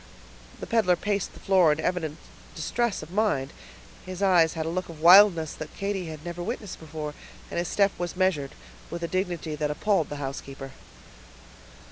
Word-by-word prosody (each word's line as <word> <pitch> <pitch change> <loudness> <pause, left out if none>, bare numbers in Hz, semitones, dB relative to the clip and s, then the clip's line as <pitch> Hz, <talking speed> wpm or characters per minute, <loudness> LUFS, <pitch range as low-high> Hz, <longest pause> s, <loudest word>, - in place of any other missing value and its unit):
The - - -5
peddler 220 -6 +3
paced 205 0 -2
the - - -12
floor 185 -5 +4
in 150 - 0
evident 160 -3 -2 0.4
distress 235 -8 -1
of 155 - -11
mind; 185 -10 0 0.5
his 185 +1 -5
eyes 175 -5 +5
had 160 -1 -2
a - - -1
look 185 +2 -3
of 165 -2 -10
wildness 170 -2 +7
that 155 - -8
Katy 195 -3 -2
had 155 0 -8
never 175 0 -5
witnessed 210 0 -5
before, 155 -1 -6 0.4
and - - -1
his 175 - -1
step 200 -1 +3
was 175 0 -3
measured, 175 -8 0 0.3
with 170 0 -5
a - - 0
dignity 175 -3 -2
that 150 0 -1
appalled 170 +2 +1
the 145 - -5
housekeeper. 135 -1 -6
170 Hz, 175 wpm, -26 LUFS, 155-190 Hz, 0.5 s, wildness